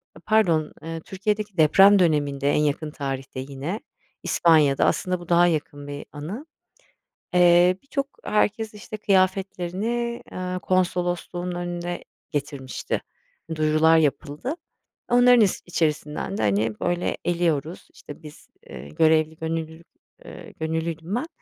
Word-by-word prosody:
eee, 160 - -14
pardon, 175 -8 +2
eee, 165 0 -5
Türkiye'deki 205 +2 -3
deprem 195 +6 +6
döneminde, 145 -4 +1
en - - +2
yakın 150 +1 -1
tarihte 135 -3 -5
yine, 140 - -5 0.4
İspanya'da, 155 -5 +4
aslında 180 -1 0
bu 175 -1 -12
daha 175 0 +5
yakın 145 -3 -3
bir 145 0 -7
anı. 175 - -7 0.9
Eee, 180 0 +5
birçok, 275 0 -3 0.2
herkes 215 +1 0
işte 210 +1 -8
kıyafetlerini, 195 +4 0
aaa, 185 0 -4
konsolosluğun 180 -1 -1
önüne 175 0 -4 0.3
getirmişti. 140 -3 -3 0.5
Duyurular 155 +1 +4
yapıldı. 150 - -1 0.5
Onların 245 0 +6
is 200 -3 +2
içerisinden 160 +3 -2
de, - - -2
hani, 105 +2 0
böyle 175 0 -1
eliyoruz, 170 -2 -1
işte, 150 +2 -12
biz, 150 -1 -13 0.2
eee, 70 - -9
görevli, 155 - +2
gönüllülük, 160 0 -5 0.4
eee, - - -11
gönüllüydüm 160 +3 -3
ben. 250 +7 -2
170 Hz, 120 wpm, -24 LUFS, 150-190 Hz, 0.9 s, deprem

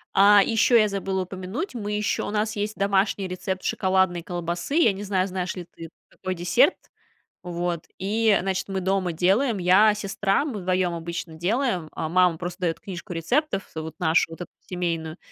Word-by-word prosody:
А, 200 +1 +7
и - - -2
ещё 225 +2 +4
я 215 -2 +4
забыла 195 -1 -2
упомянуть, 190 - -5
мы 210 -3 -4
ещё 210 0 -1
у - - -4
нас 215 +1 -1
есть 210 +2 -2
домашний 195 0 +1
рецепт 185 +1 -4
шоколадной 190 -2 +1
колбасы. 175 - -3
Я 330 -9 +5
не 200 +2 -7
знаю, 190 -2 0
знаешь 185 -1 -3
ли 180 -2 -7
ты 165 -1 -9 0.2
такой 185 -1 -5
десерт. 180 - +3 0.7
Вот. 175 -1 -3
И, 210 +1 +2
значит, 190 +1 -2
мы 190 -1 -1
дома 190 -1 0
делаем. 195 - +2
Я, 190 +4 +5
сестра, 200 +4 0
мы 240 -9 -4
вдвоём 185 -1 0
обычно 170 0 -5
делаем. 185 - -1
А 160 - -4
мама 180 0 +3
просто 175 +2 -6
даёт 170 -2 -1
книжку 180 -2 -8
рецептов, 195 - -1
а, 160 - -3
вот 160 0 -9
нашу 165 +1 +2
вот 165 - -9
эту - - -8
семейную. 170 -2 -3
190 Hz, 185 wpm, -24 LUFS, 175-205 Hz, 0.7 s, А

